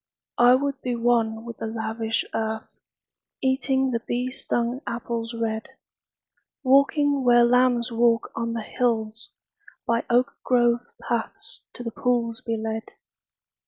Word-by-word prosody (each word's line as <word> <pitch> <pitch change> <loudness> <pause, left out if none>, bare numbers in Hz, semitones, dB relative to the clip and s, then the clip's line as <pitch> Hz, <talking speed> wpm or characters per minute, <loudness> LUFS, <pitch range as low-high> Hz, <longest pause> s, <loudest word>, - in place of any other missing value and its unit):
I 245 +1 +7
would 275 0 -2
be 245 -1 -2
one 230 -1 +1
with 235 -1 -7
the - - -4
lavish 225 0 -2
earth, 220 0 -3 0.6
Eating 265 0 +1
the 230 - 0
bee 245 +2 -2
stung 240 0 -2
apples 235 0 -3
red: 220 -1 -2 1.0
Walking 280 +1 +3
where 240 -1 +6
lambs 245 0 +3
walk 230 0 +2
on 230 0 -2
the 230 -2 -3
hills; 225 -2 -1 0.6
By 235 -2 +1
oak 245 +1 +2
grove 240 -1 +3 0.2
paths - - -4
to 245 - -7
the 230 - -4
pools 235 0 0
be 230 -2 -2
led. 220 0 -4
235 Hz, 130 wpm, -25 LUFS, 225-250 Hz, 1.0 s, I